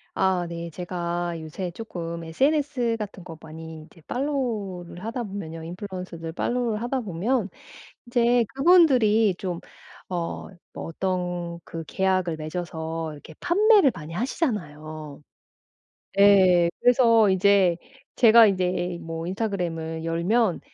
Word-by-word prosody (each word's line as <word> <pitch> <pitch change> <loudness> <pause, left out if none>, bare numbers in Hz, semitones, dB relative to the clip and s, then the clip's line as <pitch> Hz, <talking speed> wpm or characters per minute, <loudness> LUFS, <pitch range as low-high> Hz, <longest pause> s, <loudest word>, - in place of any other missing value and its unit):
아 185 -2 +1
네. 170 0 -5
제가 175 -1 -3
요새 160 +4 -5
조금 170 -4 -6
SNS 260 - +1
같은 205 -4 -7
거 165 -2 -10
많이 160 0 -9
이제 165 +1 -19
팔로우를 215 -11 -3
하다 240 +2 -3
보면요. 190 -6 -7
인플루언서들 180 -2 -7
팔로우를 235 +2 -1
하다 250 +2 -1
보면 205 +3 -1 0.6
이제 240 0 +3
그분들이 255 - +5
좀 180 -3 -4 0.5
어 175 -2 -4 0.3
뭐 - - -6
어떤 175 -1 -3
그 165 0 -6
계약을 185 -4 0
맺어서 160 0 -4
이렇게 150 +2 -13
판매를 405 - +5
많이 165 -1 -8
하시잖아요. 155 - -4 1.0
예, 185 -4 +6
그래서 230 -3 +5
이제 190 -2 +4 0.4
제가 230 -1 +8
이제 180 -2 0
뭐 165 0 -5
인스타그램을 170 -5 -3
열면 175 +5 +1
185 Hz, 265 characters per minute, -25 LUFS, 165-225 Hz, 1.0 s, 제가